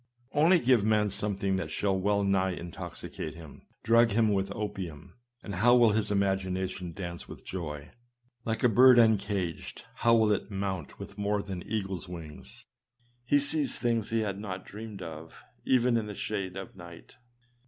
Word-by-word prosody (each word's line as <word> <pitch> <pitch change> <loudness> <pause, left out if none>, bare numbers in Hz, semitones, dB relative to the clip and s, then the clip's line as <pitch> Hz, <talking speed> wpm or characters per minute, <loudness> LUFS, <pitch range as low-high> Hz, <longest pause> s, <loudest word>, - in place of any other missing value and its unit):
Only 165 +5 +5
give 125 -7 +3
man 105 -1 +2
something 100 -1 0
that 85 -4 -3
shall 100 +5 0
w 95 +2 0
r - - +4
ell 100 - +1
nigh 95 -1 +1
intoxicate 85 -2 -7
him; 80 -3 -13 0.2
drug 115 +1 +5
him 110 -1 +2
with 100 0 -1
opium; 95 -5 -6 0.3
and 100 - -6
how 120 +6 +5
will 120 -3 +6
his 110 0 +1
imagination 95 -2 -1
dance 85 -1 -7
with - - -11
joy! 75 -3 -6 0.5
Like 115 -1 -2
a - - +7
bird 125 +2 +7
uncaged, 100 -6 +1
how^ 115 0 +5
will 110 -1 +3
it 100 -1 -1
mount 95 -5 -4
with 100 - -10
more 105 0 0
than 95 -3 -6
eagle's 95 -4 -3
wings! 85 +8 -10 0.6
He 145 +3 +4
sees 145 +1 0
things 115 -3 0
he 115 0 +1
had 100 -2 -3
not 95 -3 -6
dreamed 105 -2 -8
of 80 -1 -9 0.2
even 125 -1 +3
in 110 -2 -2
the 105 - -6
shades 95 -4 -3
of 95 0 -8
night. 85 -2 -13
100 Hz, 175 wpm, -29 LUFS, 95-110 Hz, 0.6 s, a